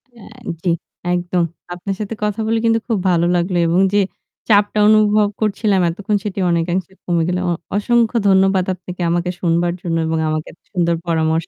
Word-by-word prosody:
অ্যা 230 - -14 0.4
জ্বী, 175 -1 +1 0.4
একদম! 175 0 0 0.3
আপনার 180 +2 -4
সাথে 210 +1 -4
কথা 210 0 -1
বলে 225 0 +1
কিন্তু 225 0 +3
খুব 225 - +1
ভালো 170 -1 +2
লাগলো 175 +1 0
এবং 170 +2 +2
যে 205 - +4 0.5
চাপটা 205 0 +3
অনুভব 215 -1 +4
করছিলাম 205 -2 +1
এতক্ষণ 205 +5 -1
সেটি 200 -1 -3
অনেকাংশে 170 +2 -1
কমে 170 -2 +1
গেল। 180 - 0
অ - - +1 0.2
অসংখ্য 235 +2 +2
ধন্যবাদ 190 -1 +3
আপনাকে 180 0 -9
আমাকে 175 +1 0
শুনবার 170 0 +1
জন্য 165 -2 -1
এবং 160 0 0
আমাকে 155 0 -2
এত - - -25
সুন্দর 170 -2 +1
পরামর্শ 160 0 0
185 Hz, 175 wpm, -18 LUFS, 170-210 Hz, 0.5 s, যে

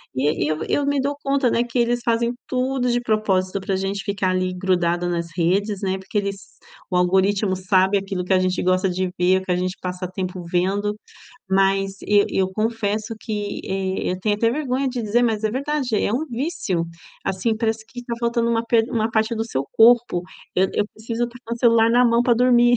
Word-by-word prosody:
e 145 +4 +1
e - - 0
eu 155 0 -1
eu 285 - +1
me 285 -1 +1
dou 280 +2 -1
conta, 275 -3 +2
né, 235 - +2
que 240 +1 -5
eles 240 0 +2
fazem, 235 +1 +1
tudo 255 0 0
de 240 - +2
propósito 200 -4 0
para 195 - -2
a - - 0
gente 195 +1 -3
ficar 200 -3 0
ali 185 0 0
grudado 175 -1 0
nas 170 -1 -2
redes, 195 +4 +1
né, 190 0 0
porque 190 +2 -5
eles 200 -2 -4 0.3
o 180 - -2
algoritmo 190 +2 +2
sabe 190 +1 +2
aquilo 190 -2 -4
que 190 - +1
a 185 - +4
gente 185 0 0
gosta 185 +1 +2
de 185 0 -2
ver, 185 +1 +4
o - - -10
que - - -2
a - - +3
gente 185 +1 -2
passa 180 0 -4
tempo 185 -1 -4
vendo, 200 +4 0 0.5
mas 195 0 +3 0.2
e 205 -1 +3
eu 190 -1 0
confesso 220 +1 -1
que, 210 -2 -4
eh, 190 -1 -2
eu 185 - -2
tenho 210 +1 +1
até 230 +2 +2
vergonha 270 0 -1
de 250 -1 -3
dizer, 225 +3 +2
mas 220 -2 0
é 215 - +2
verdade, 270 -1 -2
é 205 - 0
um 290 +6 -1
vício, 235 - -2 0.4
assim, 195 +4 0
parece 220 -1 -1
que 245 +1 -9
está 240 -1 -7
faltando 235 0 +1
uma 230 0 +1
pe 230 -1 +4
uma 225 -2 0
parte 220 +1 +1
do 225 0 -2
seu 135 -11 -2
corpo. 230 -6 +5 0.3
Eu 190 +1 +3
eu 205 - +1
preciso 230 +2 -3
trocar 235 -1 -7
um - - -8
celular 230 -1 +4
na 245 +2 +5
mão 235 0 +4
para 240 -1 +3
dormir. 245 0 +4
210 Hz, 215 wpm, -22 LUFS, 185-235 Hz, 0.5 s, corpo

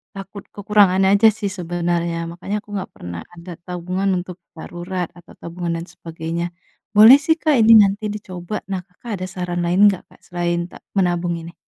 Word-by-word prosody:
takut 195 +1 -9
kekurangan 205 -2 +3
aja 200 +3 +6
sih 205 -2 -1
sebenarnya, 170 -1 -2
makanya 185 +4 -5
aku 210 - -24
nggak 195 - -5
pernah 85 -1 -7
ada 175 +1 -11
tabungan 180 +2 -2
untuk 180 0 -6 0.2
darurat 175 +2 -5
atau 175 - -16
tabungan 170 0 -4
dan - - -7
sebagainya, 165 +1 -5 0.5
boleh 220 +6 +10
sih 320 - +4
Kak 310 -3 +3
ini 225 +1 +7
nanti 200 +2 -3
dicoba. 185 -1 -7 0.2
Nah, 185 -1 -2
Kakak 200 +6 -13
ada - - -2
saran 175 -1 -3
lain 185 +4 +4
nggak 190 -3 -4
Kak - - -22
selain 175 -1 -2
ta - - -11 0.2
menabung 175 -2 +1
ini? 170 +1 -10
180 Hz, 175 wpm, -20 LUFS, 170-195 Hz, 0.5 s, boleh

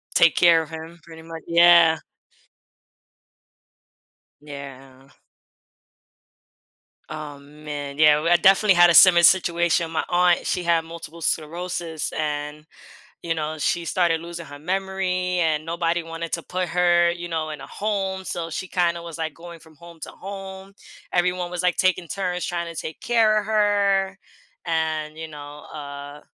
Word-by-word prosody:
Take 165 -2 +5
care 170 -2 +5
of 160 - -8
him 160 +1 -9
pretty 160 -1 -13
mu 165 0 -10
yeah. 170 -1 +6 2.4
Yeah. 135 -2 -11 2.0
Oh, 150 -2 -8
man, 145 -1 -8
yeah, 150 -1 +5
well, 165 +2 0
I 175 - +7
definitely 195 +3 +5
had 175 0 +7
a - - +2
similar 175 0 +8
situation, 170 -2 +3
my 160 -1 -2
aunt, 175 0 +2
she - - -1
had 165 -1 +1
multiple 165 0 -10
sclerosis 165 0 -3
and, 150 0 -4 0.6
you 170 - -2
know, 155 0 -4
she 170 +3 -1
started 165 -1 +1
losing 170 0 -8
her 145 0 -11
memory 185 +1 -2
and 155 -2 0
nobody 170 +1 -1
wanted 165 0 -7
to 170 - -2
put 185 +1 -3
her, 175 0 +3
you 175 0 -7
know, 160 -2 -3
in 150 -2 -7
a 135 - -9
home, 195 -2 -3
so 170 -2 -4
she 185 +4 -4
kinda 170 -1 0
was, 170 -1 -9
like, 160 -1 -4
going 170 0 -12
from 160 -1 -19
home 170 +1 -15
to - - -7
home, 195 0 -9 0.4
everyone 180 0 0
was, 180 0 -4
like, 180 -1 +1
taking 185 -2 +1
turns 180 -1 -3
trying 170 -1 -4
to - - -4
take 160 - -8
care 220 -3 +3
of 205 - -4
her 200 -2 +1 0.5
and, 160 -2 -2
you 160 0 -7
know, 145 -1 -10
uh, 145 0 -9
170 Hz, 155 wpm, -23 LUFS, 155-180 Hz, 2.4 s, similar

